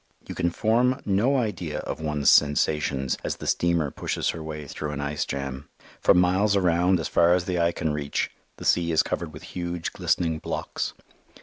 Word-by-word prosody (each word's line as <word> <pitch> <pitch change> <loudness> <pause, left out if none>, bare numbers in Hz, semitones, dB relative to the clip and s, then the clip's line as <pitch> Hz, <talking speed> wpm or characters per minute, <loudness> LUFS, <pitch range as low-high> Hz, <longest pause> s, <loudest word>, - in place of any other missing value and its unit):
You - - -5
can 85 - 0
form 120 +8 +2
no 105 +8 +2
idea 90 - -2
of - - -5
one's 75 -2 +2
sensations 75 -2 +2
as - - -2
the - - -9
steamer 85 -4 +1
pushes - - -2
her 80 - -7
way 75 -1 -6
through 75 +2 -5
an 70 - -5
ice 70 +1 -2
jam. 70 0 -5 0.3
For - - +5
miles 95 +3 +3
around, 90 -1 +3
as 80 - -2
far 85 +1 +4
as 90 -1 -1
the 90 -1 -1
eye 85 0 +3
can 80 -2 -2
reach, 75 -1 -2 0.3
the - - -8
sea 85 -1 +2
is 80 - +4
covered 85 -3 -3
with 75 - -11
huge, 85 -1 -3
glistening 80 -2 0
blocks. - - -4
85 Hz, 190 wpm, -25 LUFS, 75-90 Hz, 0.3 s, For